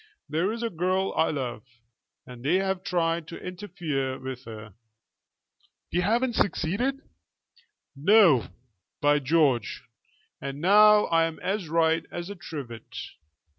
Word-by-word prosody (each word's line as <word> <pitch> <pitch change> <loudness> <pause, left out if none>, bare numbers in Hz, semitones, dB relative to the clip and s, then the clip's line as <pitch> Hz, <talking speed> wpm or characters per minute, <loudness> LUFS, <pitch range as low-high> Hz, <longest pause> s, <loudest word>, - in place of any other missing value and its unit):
There 165 +7 0
is 230 +1 -4
a 230 - -1
girl 185 +3 0
I 160 - +2
love, 125 -7 -3 0.6
and 125 -1 -11
they 155 +6 +2
have 190 -1 0
tried 165 -3 0
to 170 - -8
interfere 160 -8 -4
with 130 -1 -7
her." 110 -2 -9 1.2
"They 175 - +2
haven't 235 +7 +1
succeeded?" 220 +10 0 0.9
"No, 165 - +5 0.5
by 145 0 +3
George! 135 - +1 0.6
And 140 0 -5
now 210 +4 +6
I'm 165 -1 +2
as 190 -4 -2
right 165 0 +2
as 175 +3 -5
a - - -7
trivet. 140 - -8
165 Hz, 125 wpm, -26 LUFS, 140-190 Hz, 1.2 s, now